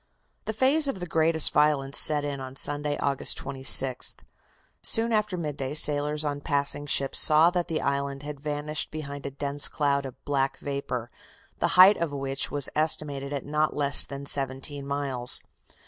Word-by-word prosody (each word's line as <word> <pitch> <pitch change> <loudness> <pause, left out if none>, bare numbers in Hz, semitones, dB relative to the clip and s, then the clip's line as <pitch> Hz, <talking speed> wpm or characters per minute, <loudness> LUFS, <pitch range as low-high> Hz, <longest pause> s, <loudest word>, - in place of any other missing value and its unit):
The 220 - -4
phase 275 +6 +2
of 190 -9 -5
greatest 160 -1 +2
violence 145 -2 +1
set 150 -1 +5
in 140 -1 -6
on 130 0 -10
Sunday, 145 +1 0
August 140 -1 -1
26th. 135 -1 +3 0.7
Soon 230 +1 0
after 210 -3 -2
midday 145 -4 -6
sailors 150 0 +5
on 145 -1 -5
passing 145 0 -2
ships 135 -1 +1
saw 155 +2 +4
that 180 -1 -3
the 160 - -4
island 140 0 -4
had 145 -1 -9
vanished 150 +1 -4
behind 145 -2 -8
a - - -5
dense 140 +1 0
cloud 140 -2 -2
of 130 - -12
black 135 -1 -2
vapor, 140 -4 -6 0.5
the - - 0
height 190 +3 +7
of 170 -3 -4
which 135 -1 -5
was 145 -2 -3
estimated 145 -3 -2
at 140 -1 -6
not 150 +1 -2
less 140 -1 +5
than 140 0 -10
seventeen 140 0 -2
miles. 135 -3 +1
145 Hz, 160 wpm, -24 LUFS, 140-155 Hz, 0.7 s, height